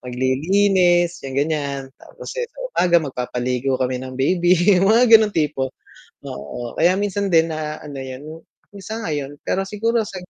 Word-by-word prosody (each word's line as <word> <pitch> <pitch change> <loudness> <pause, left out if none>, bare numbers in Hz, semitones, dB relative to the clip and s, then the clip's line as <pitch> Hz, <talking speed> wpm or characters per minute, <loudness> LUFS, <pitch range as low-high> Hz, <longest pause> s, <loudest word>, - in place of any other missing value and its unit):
maglilinis, 175 +7 +2
'yung 135 0 -6
ganiyan. 140 -2 -2
Tapos, - - -10
eh, 475 - -3
sa - - -38
umaga 175 - +3
magpapaligo 125 0 -2
kami 130 0 -1
ng 130 0 -8
baby 175 +6 +3 0.2
'yung 195 - +2
mga 230 +1 +4
gano'ng 215 -2 -1
tipo. 145 -4 0 0.5
Oo, 125 -3 -7
kaya 175 +2 +4
minsan 200 -1 -2
din 165 0 +4
na 155 0 -4
ano 145 -2 -9
'yun 145 +5 -9 0.3
ngayon 160 -9 -5
pero 195 - -1
siguro 230 +3 0
sa 195 - -9
155 Hz, 150 wpm, -20 LUFS, 135-190 Hz, 0.5 s, mga